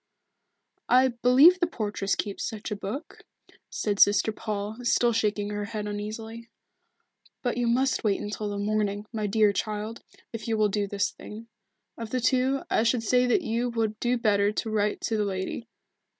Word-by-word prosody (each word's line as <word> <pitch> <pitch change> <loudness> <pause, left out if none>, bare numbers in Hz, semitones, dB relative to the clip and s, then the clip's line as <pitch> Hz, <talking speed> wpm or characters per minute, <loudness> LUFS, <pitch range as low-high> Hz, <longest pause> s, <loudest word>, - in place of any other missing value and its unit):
"I 255 +1 +5
believe 255 +9 +6
the 345 - +2
portress 205 - -2
keeps 200 -2 -4
such 215 -2 -5
a - - -1
book," 210 +11 -6 0.5
said 205 -2 -2
Sister 205 +2 +5
Paul 210 0 -4
still 240 0 +2
shaking 210 -2 0
her 205 0 -3
head 215 -1 -5
uneasily. 220 +3 -6 0.9
"But 245 -2 0
you 240 0 0
must 255 +3 +1
wait 205 -3 +1
until 210 0 -4
the 205 - -4
morning, 205 0 -1
my 215 -2 -1
dear 210 0 +3
child, 215 +3 -4 0.3
if 225 -1 -6
you 225 -1 0
will 215 -1 +3
do 205 0 -1
this 200 0 -1
thing. 225 +2 -11 0.5
Of 230 -1 -5
the 255 - -1
two, 260 +2 +1
I - - +2
should 230 0 +1
say 250 +3 +3
that 245 - +2
you 235 +2 -1
would 225 -2 -2
do 245 +1 +1
better 205 -3 +2
to 220 +1 -3
write 210 -1 0
to 225 - -1
the 210 - +1
lady. 195 +3 -4
215 Hz, 180 wpm, -27 LUFS, 205-235 Hz, 0.9 s, believe